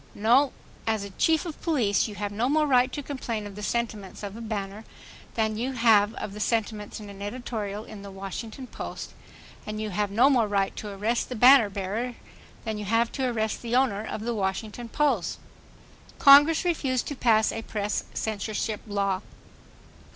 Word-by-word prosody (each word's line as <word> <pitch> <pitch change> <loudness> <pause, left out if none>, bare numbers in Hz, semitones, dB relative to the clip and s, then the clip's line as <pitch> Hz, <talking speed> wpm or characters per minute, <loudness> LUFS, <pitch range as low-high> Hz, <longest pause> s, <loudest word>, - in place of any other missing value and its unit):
No. 245 +6 +4 0.4
As 215 -2 0
Chief 320 +1 +3
of 325 -3 -7
Police 240 - +2
you 210 - -8
have 205 0 -3
no 225 +5 0
more 305 +1 +3
right 255 -2 +4
to 290 - -5
complain 235 -6 -4
of 205 - -8
the 210 - -8
sentiments 215 -3 -3
of 200 0 -5
a 230 - -8
banner 210 -1 -4 0.5
than 220 -1 0
you 260 +3 -2
have 225 -3 +4
of 195 - -5
the 210 - -8
sentiments 215 -2 -1
in 210 - -9
an 200 -1 -10
editorial 210 -2 -4
in 215 -2 -10
the 200 - -9
Washington 195 +6 -7
Post, - - -7 0.5
and 215 0 -5
you 215 -1 -3
have 205 +2 0
no 230 +7 +5
more 250 -6 +3
right 200 -1 0
to 210 - -6
arrest 215 +4 -1
the 250 - -4
banner 245 -1 +7
bearer 205 +5 -3 0.5
than 220 -1 -3
you 210 - -5
have 230 +3 +2
to 265 -2 -1
arrest 220 -3 -1
the 235 0 -2
owner 250 -6 +2
of 220 - -5
the 235 +2 -2
Washington 210 +3 -3
Post.... 295 +4 +1 0.8
Congress 290 +5 +7
refused 270 -7 0
to 290 - -4
pass 220 -4 +3
a 225 - -4
press 210 -2 -2
censorship 215 0 -2
law. 200 -2 0
220 Hz, 180 wpm, -26 LUFS, 205-245 Hz, 0.8 s, banner